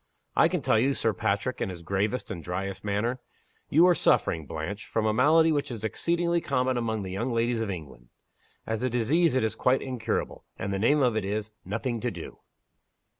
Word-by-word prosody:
"I - - +6
can - - -2
tell 110 - +3
you," 135 +4 +2
said - - -1
Sir 110 - +2
Patrick, 105 +4 -1
in - - 0
his 85 -2 -8
gravest 100 +7 -1
and 85 -6 -6
dryest 95 +2 -4
manner. 105 +5 -1 0.5
"You 165 +4 +6
are 180 - +6
suffering, 80 - +2
Blanche, 80 +8 -5
from 110 -1 -1
a 110 - +2
malady 160 +7 +5
which 145 -2 0
is 115 -4 -6
exceedingly 170 - 0
common 130 -3 0
among 110 -3 -1
the 95 - -6
young 115 +7 -2
ladies 115 0 +1
of 110 - -2
England. 75 -9 -8 0.6
As 110 -1 -2
a 130 - +1
disease 130 +7 +2
it 130 - +2
is 110 - 0
quite 130 +1 +1
incurable 120 -4 -3
and 100 +1 -3
the 95 - -1
name 140 +7 +3
of 125 -3 +2
it 110 - 0
is 105 +2 -3
Nothing 115 +5 -3
to 120 - -1
Do." 85 -7 -9
110 Hz, 210 wpm, -27 LUFS, 100-130 Hz, 0.6 s, I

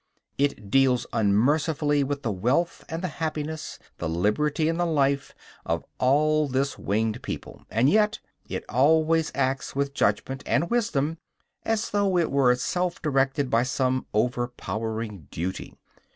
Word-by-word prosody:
It 140 -8 -1
deals 130 -1 +4
unmercifully 145 +7 +2
with 140 +1 -3
the 115 - 0
wealth 125 - 0
and 165 +2 -4
the - - +1
happiness, 155 -1 -4 0.2
the 85 - -2
liberty 120 - +1
and 165 +1 0
the 175 - +2
life, 140 -3 +1 0.3
of - - -1 0.2
all 150 +3 +3
this 135 +1 0
winged 110 +3 -1
people; - - -7
and 115 +4 +2
yet 210 +5 +3 0.3
it - - -4
always 160 +5 +3
acts 135 0 -1
with 140 0 -1
judgment 135 -1 0
and 170 +4 +1
wisdom, 165 -10 0 0.4
as 225 -1 -1
though 200 -3 +2
it 170 - +1
were 135 -3 +4
itself 175 +8 -1
directed 135 -2 +1
by 115 - +4
some 130 +1 0
overpowering 110 - -2
duty. 90 +3 -5
140 Hz, 140 wpm, -26 LUFS, 125-155 Hz, 0.4 s, deals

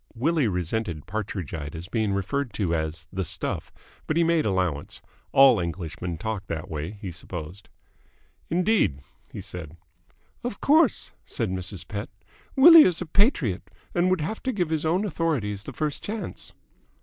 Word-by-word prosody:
Willie 150 +2 +2
resented 90 -3 -2
Partridgite 85 -7 -4
as 85 +2 -6
being 110 -1 0
referred 115 +6 -1
to 95 -6 0
as 80 0 -2
"the 95 0 -1
stuff," 85 - -3 0.4
but 155 - 0
he 170 - +5
made 165 -2 +2
allowance. 90 -7 -1 0.3
All 135 -5 +7
Englishmen 85 0 -4
talked 105 +1 -4
that 80 -1 -5
way, 80 +5 -4
he 95 - -4
supposed. 85 +2 -8 0.8
"Indeed?" 175 - +2 0.3
he - - -6
said. 85 -2 -7 0.7
"Of 240 -4 -4
course," 305 -2 +3
said 110 -6 -2
Mrs. 95 -1 -4
Pett, 105 -1 -5 0.5
"Willie 330 +4 +10
is 180 - +4
a 180 - -3
patriot 145 - +1 0.2
and 175 +1 +3
would 185 -3 +2
have 190 +9 -3
to 260 - -1
give 180 -8 -1
our 160 0 +1
own 190 +5 +1
authorities 130 - -1
the - - -6
first 150 +2 -2
chance." 215 +1 -5
105 Hz, 155 wpm, -26 LUFS, -, 0.8 s, Willie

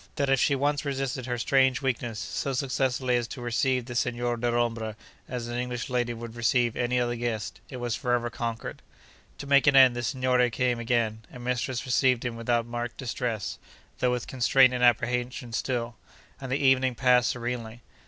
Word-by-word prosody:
That 140 -1 0
if 135 - +4
she 140 - +3
once 145 +1 0
resisted 135 -2 -3
her 120 -1 -2
strange 130 +2 +2
weakness, 120 -4 -2
so 135 +6 -3
successfully 130 -1 0
as 120 -1 -2
to 125 - -8
receive 120 +1 0
the 120 - -7
Signor 120 0 0
Dellombra 120 -2 -1 0.3
as 120 -2 -4
an 120 +1 -3
English 125 0 -4
lady 120 -1 0
would 115 0 -7
receive 120 0 +1
any 125 0 0
other 120 -1 0
guest, 115 -3 -4
it 130 - -7
was 120 -2 -2
for 125 - -1
ever 120 -1 0
conquered. 115 -1 -5 0.6
To - - -7
make 140 +1 +4
an 140 - +5
end, 130 -2 +7
the 120 - -2
signore 125 0 +1
came 120 +1 0
again, 115 -2 0
and 125 - -11
mistress 125 0 -2
received 130 -1 +2
him 120 -1 -2
without 115 0 0
marked 120 0 -5
distress 115 -4 -3 0.4
(though 125 - +2
with 125 -1 -1
constraint 130 0 +4
and 125 0 -1
apprehension 120 0 +1
still), 120 -1 -2 0.4
and 135 -1 -7
the 135 - +2
evening 130 -2 +3
passed 125 -1 +4
serenely. 120 -1 -4
125 Hz, 185 wpm, -27 LUFS, 120-130 Hz, 0.6 s, end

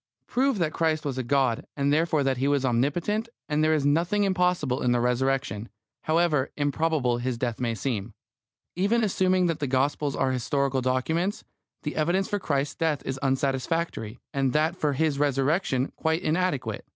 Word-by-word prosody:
Prove 265 -1 +1
that 165 -4 0
Christ 160 -2 0
was 135 -2 -2
God, 130 -2 +1
and 140 +1 +2
therefore 155 -1 +2
that 135 -1 +1
He 135 +2 0
was 140 -2 +2
omnipotent, 165 - 0 0.2
and 150 0 +1
there 155 0 +4
is 145 -2 0
nothing 170 +8 +2
impossible 180 -8 +1
in 125 - +2
the 120 - +2
Resurrection, 125 -2 0 0.4
however 155 -4 +2
improbable 145 -4 +1
His 125 0 -2
death 120 -2 -2
may 120 -2 -1
seem. 110 -1 -3 0.6
Even 205 +6 +2
assuming 185 -2 +2
that 165 -2 0
the 145 - -1
Gospels 140 +2 0
are 130 - +1
historical 135 +1 0
documents, 160 +10 0 0.4
the 150 - -3
evidence 175 +5 +1
for 205 - -1
Christ's 145 -5 -1
death 160 -3 -1
is 135 0 -3
unsatisfactory, 135 -2 -1 0.2
and 135 -2 +1
that 155 +3 +2
for 150 -5 0
His 145 0 0
Resurrection 140 0 +1
quite 160 +2 0
inadequate. 150 - -1
145 Hz, 165 wpm, -26 LUFS, 130-165 Hz, 0.6 s, there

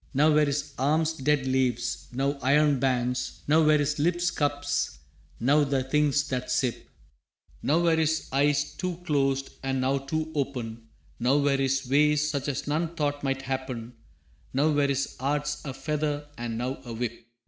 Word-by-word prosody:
Now 150 +3 +5
were 150 0 +5
his 140 0 -2
arms 155 +4 +2
dead 145 -2 +1
leaves, 125 -2 0
now 135 +3 0
iron 145 +1 +3
bands, 125 -1 -1
Now 155 +2 +5
were 155 -1 +5
his 150 0 0
lips 175 +3 +1
cups, 145 -1 -1 0.4
now 145 +5 +4
the 135 -2 0
things 145 +1 +2
that 125 -1 -3
sip, 125 -3 -1 0.7
Now 160 +4 +2
were 170 -1 +3
his 160 0 +1
eyes 145 +1 +2
too 180 -2 -3
closed, 135 -3 +1
and 135 -1 -1
now 135 +2 +1
too 155 +3 -3
open, 120 -6 -3 0.3
Now 125 +4 +3
were 140 -1 +2
his 135 -1 0
ways 150 +2 +3
such 140 -2 -2
as 140 - -2
none 160 +3 -1
thought 145 -2 -1
might 135 -1 -1
happen, 130 -3 -4 0.6
Now 150 +3 +3
were 145 -1 +2
his 140 0 -1
arts 145 +2 -1
a 135 - -3
feather 145 +2 -2
and 120 -1 -4
now 130 +3 -3
a 120 -2 -7
whip. 115 0 -4
140 Hz, 170 wpm, -27 LUFS, 130-150 Hz, 0.7 s, Now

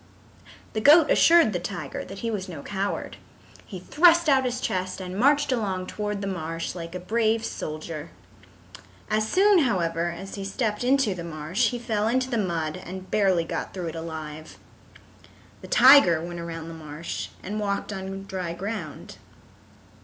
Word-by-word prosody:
The 215 - -1
goat 305 +5 +7
assured 330 -10 +5
the 175 - -1
tiger 175 -5 -5
that 195 - -9
he 230 - -2
was 195 -3 -4
no 155 -5 -8
coward. 200 0 -3 0.5
He 190 - -7
thrust 335 - +4
out 265 -3 +4
his 250 0 -2
chest 185 -5 -2
and 185 -1 -6
marched 285 +6 +3
along 195 -7 -1
toward 210 0 -4
the - - -3
marsh 165 -3 -4
like 170 0 -7
a - - -3
brave 220 +4 0
soldier. 155 0 -6 1.0
As 215 0 +1
soon, 395 0 +5
however, 175 - 0
as 180 +3 -8
he 200 - -5
stepped 210 +3 -2
into 260 -4 +2
the 175 -2 -7
marsh, 170 +8 -1
he 245 - -4
fell 220 -3 -1
into 255 +3 0
the 235 - +1
mud 170 -3 -2
and 185 +1 -8
barely 190 -5 +3
got 165 - -5
through 175 -3 -3
it 160 - -8
alive. 155 -1 -7 1.0
The - - -10
tiger 255 - +7
went 175 +1 -6
around 165 -1 -6
the - - -8
marsh 155 0 -6
and 210 +3 -4
walked 200 0 -2
on 195 0 -6
dry 185 -3 -4
ground. 200 +5 -6
195 Hz, 170 wpm, -25 LUFS, 170-230 Hz, 1.0 s, goat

